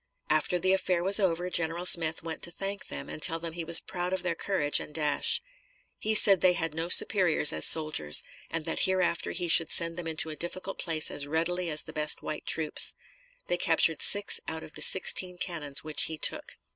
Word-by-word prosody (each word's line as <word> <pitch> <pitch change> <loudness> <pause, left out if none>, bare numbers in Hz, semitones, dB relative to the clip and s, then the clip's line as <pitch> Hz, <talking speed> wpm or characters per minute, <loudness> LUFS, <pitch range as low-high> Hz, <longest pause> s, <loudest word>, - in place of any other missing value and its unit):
After 155 +3 0
the 185 +2 0
affair 185 -2 -2
was 195 +3 0
over, 180 -2 -1
General 170 +1 -2
Smith 160 -3 +3
went 165 -1 -8
to - - -1
thank 195 +3 -7
them, - - -8
and 155 - -9
tell 165 -1 +3
them 165 0 -8
he 170 0 -5
was 170 +1 +4
proud 180 0 -6
of 190 - -4
their 180 -2 -2
courage 165 -4 0
and - - -10
dash. 150 - 0 0.6
He 220 0 -2
said 195 -3 +6
they 185 -1 +3
had 165 -2 -4
no 165 +2 -4
superiors 180 -7 +5
as 80 - +4
soldiers, 155 - +3 0.3
and 165 -1 -4
that 165 - -4
hereafter 185 -3 -2
he 175 0 -4
should 165 -1 +4
send 165 0 +2
them 175 -2 -7
into 160 0 -2
a - - -8
difficult 185 +4 -7
place 160 -3 0
as 145 - -1
readily 170 +3 -3
as 150 -1 -1
the - - -12
best 150 0 0
white 155 - -7
troops. 160 -2 +2 0.5
They 175 - -3
captured 165 -2 +2
six 205 0 +2
out 160 0 -6
of - - -14
the - - -10
sixteen 185 -1 +2
cannons 155 -7 -2
which 155 -1 -1
he 160 - -4
took. - - -4
165 Hz, 210 wpm, -27 LUFS, 155-180 Hz, 0.6 s, said